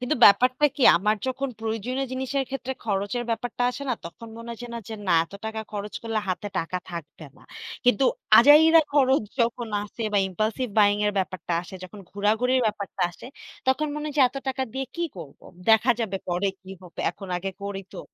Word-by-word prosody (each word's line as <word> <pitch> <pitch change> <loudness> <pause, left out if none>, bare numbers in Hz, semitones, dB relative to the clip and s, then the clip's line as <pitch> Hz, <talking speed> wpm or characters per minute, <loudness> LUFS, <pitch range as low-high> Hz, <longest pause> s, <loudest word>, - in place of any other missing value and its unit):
কিন্তু 250 +4 0
ব্যাপারটা 250 +7 +5
কি, 280 - -2
আমার 210 +5 +1
যখন 265 +1 -2
প্রয়োজনীয় 225 +4 -2
জিনিসের 265 +1 -1
ক্ষেত্রে 265 -1 -4
খরচের 205 +3 -1
ব্যাপারটা 245 +1 -2
আসে 250 +3 -7
না? 250 - +1
তখন 170 +7 -9
মনে 230 0 -9
হয়েছে 235 +1 -7 0.2
যে 225 - -5
না - - +3
এত 165 - -22
টাকা 220 0 -3
খরচ 205 0 -5
করলে 225 -1 -1
হাতে 185 +3 -2
টাকা 175 +2 -2
থাকবে 165 -2 -8
না। - - -19 0.4
কিন্তু 245 0 +4 0.3
আজাইরা 310 +6 +8
খরচ 270 -2 +4 0.2
যখন 235 0 0
আসে, 210 +3 -7
বা 205 - +4
ইমপালসিভ 215 +6 -2
বায়িং 205 -1 +5
এর 205 - +1
ব্যাপারটা 185 -2 -3
আসে, 180 - -11
যখন 200 +3 -11
ঘোরাঘুরির 220 +6 +1
ব্যাপারটা 200 -3 -3
আসে, 175 - -12 0.4
তখন 265 +4 +2
মনে 300 0 -4
হয় 295 - -5
যে - - +4
এত 275 - -12
টাকা 265 0 -1
দিয়ে 265 0 -3
কি 340 - 0
করবো? 160 -6 -11 0.2
দেখা 225 +3 +5
যাবে 200 -4 -1
পরে 180 +3 0
কি 190 - -12
হবে, 180 -2 -9
এখন 195 -2 -11
আগে 190 +2 -3
করি 200 -1 -4
তো। - - -8
225 Hz, 190 wpm, -25 LUFS, 200-260 Hz, 0.4 s, আজাইরা